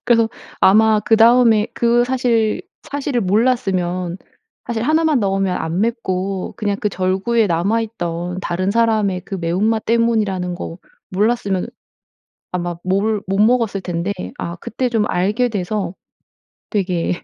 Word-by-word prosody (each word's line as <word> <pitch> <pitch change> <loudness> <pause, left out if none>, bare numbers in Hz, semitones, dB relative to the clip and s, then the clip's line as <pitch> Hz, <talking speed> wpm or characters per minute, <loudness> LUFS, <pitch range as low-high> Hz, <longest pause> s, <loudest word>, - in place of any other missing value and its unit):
그래서 230 -2 +3 0.3
아마 215 +2 +5
그다음에 225 0 +5
그 235 0 +3
사실 245 -4 +1 0.2
사실을 285 -4 -2
몰랐으면 185 -5 0 0.5
사실 230 -2 -2
1 315 +6 +2
만 305 -5 +3
넣으면 195 -2 0
안 165 +4 -2
맵고 195 -5 -2
그냥 205 -2 -1
그 210 - +1
절구에 190 +4 +1
남아 195 +6 +1
있던 175 -4 -4
다른 185 +2 -1
사람의 215 -4 +1
그 - - -5
매운맛 195 +6 0
때문이라는 215 -6 +1
거 170 -1 -7 0.3
몰랐으면 200 -1 0 0.9
아마 175 -1 -2
몰 200 +3 0
못 195 +1 -1
먹었을 220 -3 +2
텐데 175 +2 -2 0.3
아 170 +1 -4
그때 245 +7 -3
좀 220 -3 +1
알게 210 +8 +1
돼서 195 -3 -3 0.8
되게 180 -4 -1
205 Hz, 265 characters per minute, -19 LUFS, 185-230 Hz, 0.9 s, 아마